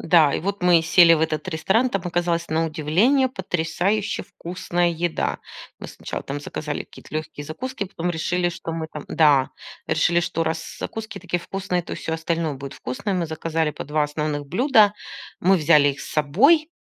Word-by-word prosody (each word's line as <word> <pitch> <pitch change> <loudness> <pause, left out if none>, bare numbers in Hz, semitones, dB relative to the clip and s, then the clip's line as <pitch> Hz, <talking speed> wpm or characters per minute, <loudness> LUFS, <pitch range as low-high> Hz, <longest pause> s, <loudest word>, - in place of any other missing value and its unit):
Да, 160 -3 +4
и - - 0
вот 200 +1 -3
мы 175 -2 +5
сели 165 +1 +6
в 155 - -1
этот 155 +1 -1
ресторан. 195 +9 +1
Там 195 -3 -2
оказалась 170 -1 -1
на 160 +1 +1
удивление 185 - +2
потрясающе 190 0 -1
вкусная 175 0 -2
еда. 170 0 -1 0.4
Мы - - -7
сначала - - -6
там 145 +1 -5
заказали 145 0 -5
какие-то - - -14
лёгкие 155 -1 -5
закуски, 205 - -5
потом 180 -2 -3
решили, 175 +2 0
что 175 -1 -6
мы 160 -1 -3
там 150 - -7
да, 145 -4 +4 0.4
решили, 175 0 +3
что 165 -1 -1
раз 160 0 -4
закуски 220 -1 -6
такие 175 -1 -2
вкусные, 190 -1 -3
то - - -8
и - - -4
всё 160 - -4
остальное 165 -1 -2
будет 135 +1 -8
вкусное. 190 +11 -4
Мы 175 -2 -1
заказали 160 0 -1
по - - -7
2 150 +1 0
основных 150 -1 -3
блюда. 215 - +4 0.5
Мы 190 +2 +4
взяли 150 -3 +5
их 140 0 -3
с - - -8
собой, 265 - +4
165 Hz, 180 wpm, -23 LUFS, 155-185 Hz, 0.5 s, сели